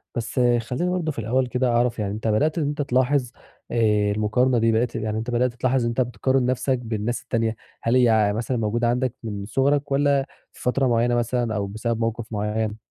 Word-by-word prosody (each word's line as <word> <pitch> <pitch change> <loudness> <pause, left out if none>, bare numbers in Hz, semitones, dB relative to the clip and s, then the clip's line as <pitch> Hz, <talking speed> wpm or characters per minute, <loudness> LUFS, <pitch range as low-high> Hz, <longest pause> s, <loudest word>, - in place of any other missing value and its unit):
بس 120 +2 -3 0.2
خلّيني 125 +10 -2
برضه 170 -4 -1
في 130 - -7
الأول 125 +4 0
كده 125 +1 0
أعرَف 120 0 +1
يعني 100 -1 -2
أنت 110 +1 -4
بدأت 150 +10 +1
إن 160 - +1
أنت 145 0 -2
تلاحظ 130 -1 +1 0.4
آآ 105 -3 +2
المقارنة 115 +5 +1
دي 115 0 +3
بدأت 115 +2 0
يعني 110 -1 -2
بدأت 120 +1 0
تلاحظ 125 +1 +1
إن 115 - 0
أنت 120 +2 0
بتقارِن 125 +2 0
نَفسك 130 +1 0
بالناس 115 0 -3
التانية. 115 -1 -1 0.3
هل 115 +2 +2
هي 110 -4 +4
مثلًا 120 +3 -2
موجودة 115 +2 0
عندك 125 0 0
من 100 -3 -5
صغرك 140 +5 +1
والّا 140 -1 +2 0.3
في - - -16
فترة 130 +1 +1
مُعيّنة 120 +1 +2
مثلًا 120 -1 0
أو 100 -1 -1
بسبب 110 +3 -3
موقف 115 0 -2
مُعيّن؟ 105 +1 -2
120 Hz, 195 wpm, -23 LUFS, 110-130 Hz, 0.4 s, هي